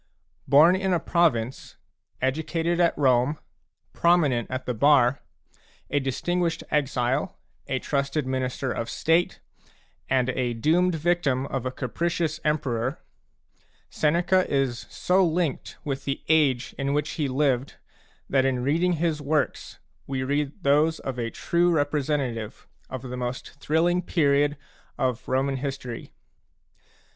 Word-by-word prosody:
Born 160 +6 +6
in 190 0 0
a 175 - +2
province, 135 -10 0 0.5
educated 160 +5 0
at 170 -1 +3
Rome, 130 +1 +3 0.6
prominent 150 -9 +2
at 130 0 -4
the 125 - -1
bar, 135 +1 +4 0.7
a 145 - +2
distinguished 165 +6 -1
exile, 135 +2 0 0.3
a 130 - -1
trusted 140 +2 -1
minister 130 0 -2
of 115 - -3
State, 165 +2 +1 0.7
and 130 -1 +2
a 125 -2 -1
doomed 170 +8 +2
victim 155 -5 +1
of 130 -2 -3
a - - -2
capricious 160 +5 -2
emperor, 135 -4 -1 0.9
Seneca 175 +4 +2
is 135 -4 -1
so 185 +1 +2
linked 165 -4 -1
with 135 -2 -4
the 135 - -3
age 140 -6 +2
in 140 +1 0
which 150 +1 -1
he 150 -3 -1
lived 135 -1 0 0.5
that 135 -1 +2
in 130 -2 0
reading 165 +6 +2
his 160 -2 -1
works 145 +1 -1 0.3
we 130 -1 -2
read 145 +6 -2
those 150 +3 +3
of 130 -2 -5
a 115 -1 -1
true 175 +8 +1
representative 145 -7 -1 0.2
of 130 -1 -6
the 125 -1 -6
most 125 0 -4
thrilling 170 +4 +1
period 145 -4 +2 0.4
of 125 -3 -1
Roman 135 +1 0
history. 135 -3 -5
140 Hz, 130 wpm, -25 LUFS, 130-160 Hz, 0.9 s, Born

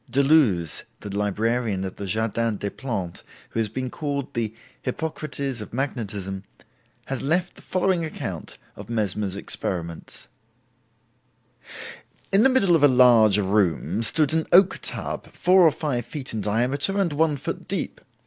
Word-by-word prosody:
Deleuze, 135 - +3 0.2
the 100 -1 -6
librarian 105 0 0
at 95 - -7
the 100 - -5
Jardin 110 +2 0
des 100 0 -3
Plantes, 100 -10 -5 0.3
who - - -2
has 110 -2 0
been 130 +3 -4
called 140 -3 -3
the 115 -2 -1 0.3
Hippocrates 140 -3 -3
of 105 - -8
magnetism, 100 -8 -3 0.6
has 135 -2 -3
left 175 +5 0
the - - -13
following 185 -2 0
account 160 - -6 0.2
of - - -10
Mesmer's 105 -3 -1
experiments: 85 -4 -2 2.1
"In 195 - +6
the 265 - +6
middle 200 -10 +4
of 160 - +2
a 145 - +8
large 120 -6 +6
room 95 -1 +1
stood 150 +6 +3
an 160 0 0
oak 190 +1 +6
tub, - - -3
four 185 +1 +4
or 165 -3 +7
five 140 -6 -2
feet 140 -5 -6
in 110 - -2
diameter 130 - +1
and 175 -6 +1
one 150 0 +2
foot - - -5
deep. - - -3
125 Hz, 150 wpm, -24 LUFS, 105-150 Hz, 2.1 s, a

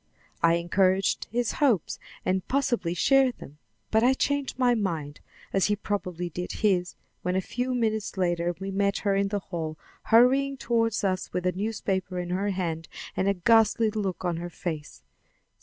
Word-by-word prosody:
I 165 0 +5
encouraged 185 +3 +2
his 240 +1 0
hopes, 245 - +1 0.3
and 185 0 0
possibly 240 -11 0
shared 270 +6 +3
them; 145 +2 -12 0.3
but 220 +1 +3
I 260 +2 +5
changed 285 -1 -1
my 250 -2 +4
mind, 165 -10 -2 0.3
as 195 - +3
he 210 - +2
probably 180 -4 -3
did 180 +1 -5
his, 180 -4 +2 0.3
when 180 +1 -1
a - - +3
few 250 +6 -2
minutes 220 -4 -1
later 175 -1 0
we 195 0 -4
met 200 +1 +1
her 200 - +3
in 200 0 +2
the 205 +1 -1
hall 165 -5 -5 0.3
hurrying 270 +4 +4
toward 230 -3 +1
us 185 -1 -1
with 180 0 -2
a 180 - +3
newspaper 190 -2 -2
in 175 0 -3
her 195 +3 0
hand 170 -4 -3 0.3
and 190 - 0
a 200 - +2
ghastly 225 +3 +4
look 195 -4 -3
on 175 -2 0
her 175 +1 -5
face. 160 -4 -6
195 Hz, 175 wpm, -27 LUFS, 175-225 Hz, 0.3 s, I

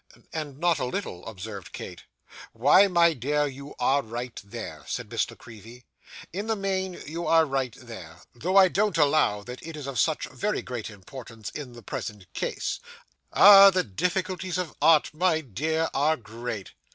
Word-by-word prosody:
'And 150 -4 -5
not 170 +1 +2
a - - -1
little,' 125 - -4
observed 100 -2 -8
Kate. - - -8 0.5
'Why, 145 - +6
my 170 -3 +4
dear, 145 +3 0
you 140 0 -8
are 135 +3 +3
right 120 +1 -6
there,' 100 - -8
said - - -5
Miss - - 0
La - - -12
Creevy, 120 +2 -13 0.5
'in 200 +4 -4
the 225 - +1
main 190 -2 -2
you 165 +3 -5
are 165 -1 +5
right 135 -4 -2
there; 105 -10 -10 0.2
though 180 +11 0
I 190 -1 +8
don't 200 -1 0
allow 140 -9 +3
that 125 +3 -9
it 165 -1 -8
is 145 - -7
of 140 -2 -3
such 155 -2 +1
very 210 +1 -3
great 120 -3 -5
importance 110 +2 -10
in 135 -5 -7
the 120 -1 -12
present 100 -1 -7
case. - - -3 0.5
Ah! 200 -1 +9
The 185 -1 +1
difficulties 180 - -2
of 180 -3 -3
Art, 155 0 +5
my 165 0 +2
dear, 160 +6 -1
are 155 +3 +2
great. 115 -2 -7
145 Hz, 175 wpm, -26 LUFS, 120-175 Hz, 0.5 s, Ah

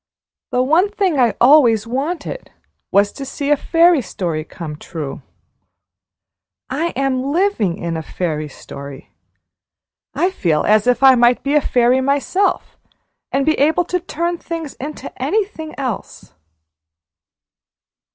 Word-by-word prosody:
The 250 - +1
one 330 +9 +3
thing 385 -8 0
I 240 -3 +3
always 240 -5 +5
wanted 300 - -4 0.4
was 200 +1 +3
to 275 - -8
see 280 +2 -3
a - - +6
fairy 335 +1 +3
story 170 -7 -3
come 155 -1 -8
true. 150 -2 -7 1.5
I 305 +6 0
am 270 -1 0
living 330 - +1
in 170 -1 -4
a 160 - -3
fairy 155 -2 -3
story! 140 0 -10 1.0
I 365 +2 +1
feel 165 - 0
as 215 +2 +3
if 250 +2 +2
I 265 -1 +9
might 240 0 +3
be 280 - 0
a 300 - +4
fairy 250 0 +2
myself, 285 +9 0 0.5
and 275 0 +1
be 315 - +3
able 315 +5 +3
to 360 - -1
turn 340 0 -3
things 330 -4 -6
into 295 +3 -7
anything 395 -7 -2
else!" 255 -7 -5
270 Hz, 130 wpm, -18 LUFS, 210-325 Hz, 1.5 s, I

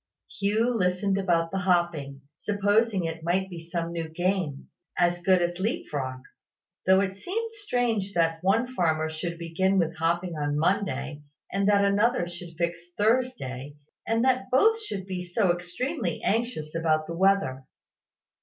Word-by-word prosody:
Hugh 215 +4 +2
listened 195 -1 +1
about 170 -3 +1
the 195 - -1
hopping, 170 -7 0
supposing 205 +2 +1
it 165 0 -4
might 190 +3 0
be 175 - -6
some 170 0 -4
new 165 -1 -4
game, 175 -3 -1 0.3
as 175 0 +2
good 185 -1 +4
as 175 +1 -2
leap 210 +5 -2
frog; 130 -3 -3 0.7
though 190 +1 +6
it 195 -1 -2
seemed 450 - -4
strange 240 - -1
that 165 -1 +1
one 230 +7 +2
farmer 160 -6 +1
should 170 +2 -4
begin 185 +3 +1 0.2
hopping 170 +1 0
on 145 -1 -1
Monday, 150 -5 0 0.3
and 195 +1 +1
that 200 -1 +4
another 205 0 +2
should 175 -1 -9
fix 170 +1 -3
Thursday; 205 - 0 0.3
and 225 +2 +2
that 260 -1 +2
both 445 - +4
should 200 - -5
be 185 -2 -4
so 180 +1 +1
extremely 180 - -3
anxious 225 -9 -1
about 160 -2 +1
the 165 - -5
weather. 180 -9 +2
180 Hz, 150 wpm, -27 LUFS, 165-205 Hz, 0.7 s, though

